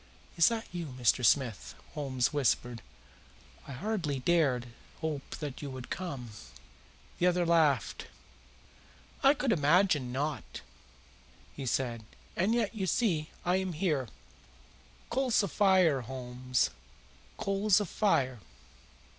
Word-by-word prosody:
"Is 170 - +6
that 230 -1 -3
you, 175 -2 -4
Mr. 125 0 +2
Smith?" 120 -3 +1 0.2
Holmes 135 -3 -1
whispered. 120 -4 0 0.9
"I 140 - -7
hardly 170 -2 -2
dared 135 -4 +2 0.3
hope 155 -4 -4
that 145 -4 -6
you 145 - -5
would 130 -1 -8
come." 140 -11 -5 0.9
The 180 - +3
other 180 0 +2
laughed. 160 -7 +2 1.1
"I 275 +2 +6
should 260 - +1
imagine 150 - +3
not," 145 +4 -3 0.9
he 135 -2 -5
said. 120 -2 -1 0.3
"And 200 +7 +2
yet, 230 -3 0
you 195 -4 -2
see, 170 -7 +1 0.2
I 180 +1 +3
am 190 -1 -2
here. 155 -6 0 1.0
Coals 250 -3 +2
of 195 - -3
fire, 185 -9 +4
Holmes 125 0 -2 0.7
coals 200 +1 +2
of 205 - -2
fire!" 130 - +1
155 Hz, 120 wpm, -31 LUFS, 130-190 Hz, 1.1 s, Is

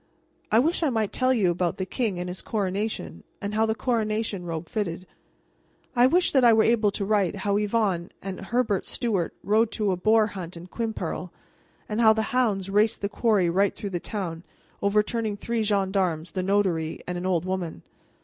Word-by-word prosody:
I 215 - +5
wish 315 +10 +2
I 315 - +2
might 220 -5 -1
tell 255 0 +2
you 205 -8 +3
about 175 -1 -1
the 190 - -2
king 210 -3 -2
and 180 - -3
his 180 +1 -5
coronation, 195 - -3 0.2
and 200 +1 -4
how 220 +1 +2
the 220 - 0
coronation 215 -5 -1
robe 165 -1 -4
fitted. 185 -5 -3 0.9
I 245 +1 +6
wish 355 +6 +3
that 265 -3 +4
I 235 -1 +7
were 220 0 +5
able 225 -2 +3
to 200 0 -3
write 200 -3 +1
how 200 +1 -1
Yvonne 205 -5 0
and 195 -1 -6
Herbert 220 -1 0
Stuart 200 -8 -1
rode 215 +2 +3
to 210 -3 +1
a - - +1
boar 215 +4 +4
hunt 185 -5 -7
in 170 - -9
Quimperle, 225 +4 -4 0.6
and 215 +2 -1
how 220 -1 +7
the 220 0 0
hounds 210 -7 +1
raced 215 +3 +2
the 200 - -1
quarry 205 -3 +2
right 195 +4 +2
through 200 - -5
the 175 - -2
town, 170 -5 -4 0.4
overturning 210 +1 +1
three 230 +2 -2
gendarmes, 190 -5 0
the 185 - -2
notary, 185 -5 0
and 180 - -4
an 175 +1 -3
old 175 -2 +1
woman. 185 -3 -3
205 Hz, 190 wpm, -26 LUFS, 185-220 Hz, 0.9 s, I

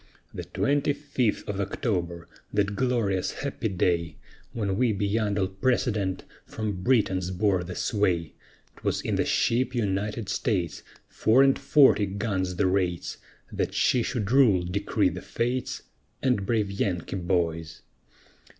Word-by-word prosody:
The - - -6
twenty 145 +1 +1
fifth 140 -6 -1
of 100 -1 -3
October, 90 -5 -2 0.2
that 100 -1 0
glorious 115 -8 0
happy 140 -5 -2
day, 85 -4 0 0.4
When 100 -4 -2
we 120 +1 +2
beyond 105 +1 0
all 95 - +2
precedent, 100 -1 0 0.2
from 105 -4 -4
Britons 95 -6 +2
bore 95 -1 +1
the 90 +1 -7
sway, 90 -7 0 0.4
'Twas - - -1
in - - -2
the - - +1
ship 125 +2 +1
United 105 0 -1
States, 95 - -1 0.3
Four 125 +5 +4
and 135 -1 +3
forty 135 -8 +5
guns 95 -2 -2
the 95 - +1
rates, 90 -2 0 0.3
That - - -2
she 125 - +3
should 115 -3 -2
rule, 120 -10 +5
decreed 95 0 0
the 90 - -6
Fates, 125 +2 -2 0.4
And 125 -8 +1
brave 110 -4 +1
Yankee 95 -2 -2
boys. 85 -3 -1
100 Hz, 135 wpm, -26 LUFS, 90-115 Hz, 0.4 s, forty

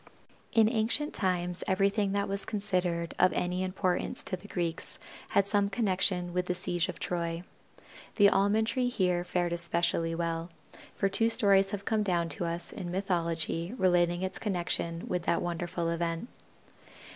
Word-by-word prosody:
In 225 -1 +5
ancient 230 +6 +1
times 180 -2 0
everything 195 +1 +2
that 200 0 0
was 200 0 -2
considered 180 -5 -1
of 185 - +5
any 180 +1 -1
importance 185 -1 -1
to - - -2
the 185 +3 -12
Greeks 170 -4 -3 0.3
had 200 - +3
some 200 0 +1
connection 185 -4 0
with 180 0 -1
the 180 - 0
siege 175 -1 0
of - - -5
Troy. 170 -1 -2 0.7
The 205 -2 +7
Almond 200 +3 +3
tree 245 +2 0
here 180 -6 +1
fared 175 -1 -1
especially 170 -1 0
well, 165 0 -2 0.5
for 195 - +1
two 225 +4 +2
stories 195 -3 +4
have 200 -1 -5
come 220 -1 +1
down 175 -4 0
to 165 +3 -2
us 170 +1 -3
in 180 -3 -6
mythology 170 0 -1
relating 175 -2 +2
its 185 0 -1
connection 175 -4 -2
with 180 - -1
that 170 - +2
wonderful 175 0 -2
event. 170 +6 -2
180 Hz, 155 wpm, -30 LUFS, 170-200 Hz, 0.7 s, The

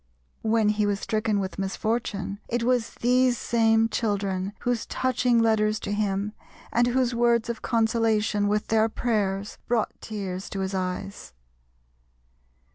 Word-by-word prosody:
When 220 -1 +2
he 210 0 +1
was 200 -1 0
stricken 215 -1 0
with 190 0 -4
misfortune, 200 0 -2
it 240 0 -1
was 245 -1 +1
these 250 0 +3
same 225 -1 +3
children 200 -3 -1
whose 245 -2 -1
touching 250 -1 +1
letters 215 -2 +2
to 200 - -4
him 205 0 -1 0.4
and 240 +1 +3
whose 250 0 +1
words 235 -1 +2
of 235 - -4
consolation, 220 -3 +1
with 210 +1 0
their 220 0 +3
prayers, 205 -4 -1
brought 235 -3 -1
tears 195 -3 -5
to 195 - -4
his 190 0 -2
eyes. 185 - -4
220 Hz, 135 wpm, -26 LUFS, 200-235 Hz, 0.4 s, these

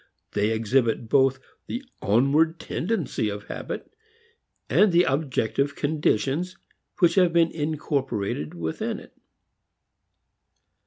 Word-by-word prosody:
They 105 +1 +1
exhibit 115 +1 +1
both 135 0 +4 0.3
the 245 - -4 0.2
onward 145 +10 +3
tendency 170 - -2
of 105 0 -5
habit - - -6 0.7
and 210 -2 +4
the 175 +1 +5
objective 140 -1 0
conditions 155 - 0 0.4
which 175 -4 +4
have 180 -3 +4
been 165 -1 +3
incorporated 135 - -2
within 80 -2 -3
it. - - -16
140 Hz, 100 wpm, -25 LUFS, 110-165 Hz, 0.7 s, the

